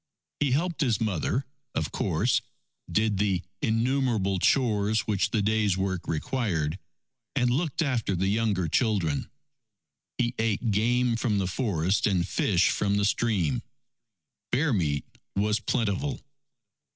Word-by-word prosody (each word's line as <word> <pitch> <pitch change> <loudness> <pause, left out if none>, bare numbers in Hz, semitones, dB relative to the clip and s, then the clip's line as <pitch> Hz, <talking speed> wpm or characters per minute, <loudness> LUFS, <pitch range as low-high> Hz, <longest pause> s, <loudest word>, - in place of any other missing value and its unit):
He 145 - +2
helped 170 +4 0
his 120 -8 +2
mother, 110 - -1 0.3
of 80 - -1
course, - - +1 0.5
did 105 +1 +1
the 95 -3 +1 0.2
innumerable 115 -4 +1
chores 110 -3 +2
which 100 -3 0
the 105 -3 0
day's 105 -2 +2
work 95 -2 -2
required, 85 - -1 0.6
and 125 -2 +2
looked 155 +4 0
after 120 -9 0
the 90 +2 0
younger 100 -4 +1
children. 90 - 0 0.9
He 120 -1 0
ate 110 0 0
game 120 +3 +2
from 115 -3 0
the 95 - +1
forest 95 -2 0
and 90 -3 +1
fish 95 -3 +2
from 100 0 +1
the 100 - +2
stream. 100 - +1 0.9
Bear 140 +2 +2
meat 75 -8 0 0.3
was 105 +2 +1
plentiful. 115 +4 -1
105 Hz, 125 wpm, -27 LUFS, 95-120 Hz, 0.9 s, He